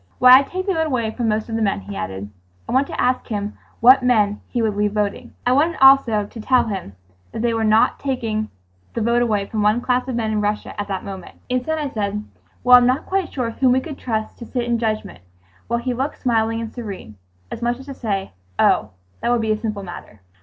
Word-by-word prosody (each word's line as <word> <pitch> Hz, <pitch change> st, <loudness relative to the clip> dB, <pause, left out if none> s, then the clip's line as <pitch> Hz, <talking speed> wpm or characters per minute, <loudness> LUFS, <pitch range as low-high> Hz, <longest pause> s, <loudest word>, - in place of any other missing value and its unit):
Why, 255 Hz, +1 st, +9 dB
I'd 275 Hz, -, -3 dB
take 370 Hz, +1 st, -4 dB
the 390 Hz, -, +1 dB
vote 320 Hz, -2 st, 0 dB
away 235 Hz, -6 st, -1 dB
from 235 Hz, 0 st, -2 dB
most 215 Hz, 0 st, 0 dB
of 225 Hz, -, -4 dB
the 225 Hz, -, -1 dB
men," 200 Hz, -, 0 dB
he 100 Hz, +1 st, -8 dB
added. 95 Hz, +2 st, -5 dB, 0.4 s
I -, -, -5 dB
wanted 265 Hz, +2 st, +2 dB
to -, -, -6 dB
ask 255 Hz, 0 st, +1 dB
him 205 Hz, -1 st, -3 dB, 0.3 s
what 255 Hz, +3 st, +7 dB
men 215 Hz, -5 st, +2 dB
he 245 Hz, -, -3 dB
would 220 Hz, -3 st, 0 dB
leave 205 Hz, 0 st, 0 dB
voting. 210 Hz, +4 st, -2 dB
I 245 Hz, -, +3 dB
wanted 305 Hz, +6 st, +2 dB
also 265 Hz, -6 st, +6 dB
to 225 Hz, -, -11 dB
tell 255 Hz, +3 st, +3 dB
him 190 Hz, -, -5 dB, 0.4 s
they 235 Hz, +1 st, -1 dB
were 220 Hz, 0 st, +4 dB
taking 225 Hz, -5 st, -2 dB, 0.5 s
the 230 Hz, -, -1 dB
vote 235 Hz, +2 st, +2 dB
away 210 Hz, -4 st, +1 dB
from 215 Hz, +1 st, -3 dB
one 210 Hz, +3 st, +3 dB
class 250 Hz, +1 st, 0 dB
of 255 Hz, -, -3 dB
men 225 Hz, -2 st, -1 dB
in 215 Hz, -1 st, 0 dB
Russia 210 Hz, 0 st, -2 dB
at 205 Hz, -, -6 dB
that 195 Hz, -2 st, -4 dB
moment. 190 Hz, -2 st, -8 dB
Instead, 255 Hz, +6 st, -1 dB
I 300 Hz, -2 st, -2 dB
said, 210 Hz, -4 st, -3 dB, 0.4 s
"Well, 250 Hz, 0 st, +9 dB
I'm 245 Hz, -, +3 dB
not 255 Hz, +3 st, +1 dB
quite 380 Hz, -2 st, -1 dB
sure 245 Hz, -4 st, -2 dB
whom 255 Hz, +1 st, +2 dB
we 260 Hz, -, +3 dB
could 285 Hz, +1 st, -8 dB
trust 220 Hz, -3 st, -3 dB
to 235 Hz, -, -7 dB
sit 250 Hz, -2 st, -2 dB
in 240 Hz, -1 st, 0 dB
judgment"—while 95 Hz, -, -5 dB
he 250 Hz, +1 st, -2 dB
looked 265 Hz, +4 st, -3 dB
smiling 225 Hz, -2 st, +1 dB
and 225 Hz, -1 st, -6 dB
serene, 200 Hz, -, -8 dB, 0.3 s
as -, -, -6 dB
much 240 Hz, 0 st, 0 dB
as 265 Hz, -, -12 dB
to 280 Hz, -, -7 dB
say, 200 Hz, -6 st, -3 dB, 0.3 s
"Oh, 105 Hz, -, +3 dB, 0.3 s
that -, -, -1 dB
would 240 Hz, -1 st, +2 dB
be 220 Hz, -1 st, 0 dB
a 215 Hz, -, 0 dB
simple 215 Hz, -3 st, -3 dB
matter." 175 Hz, -, -10 dB
225 Hz, 230 wpm, -21 LUFS, 210-250 Hz, 0.5 s, Why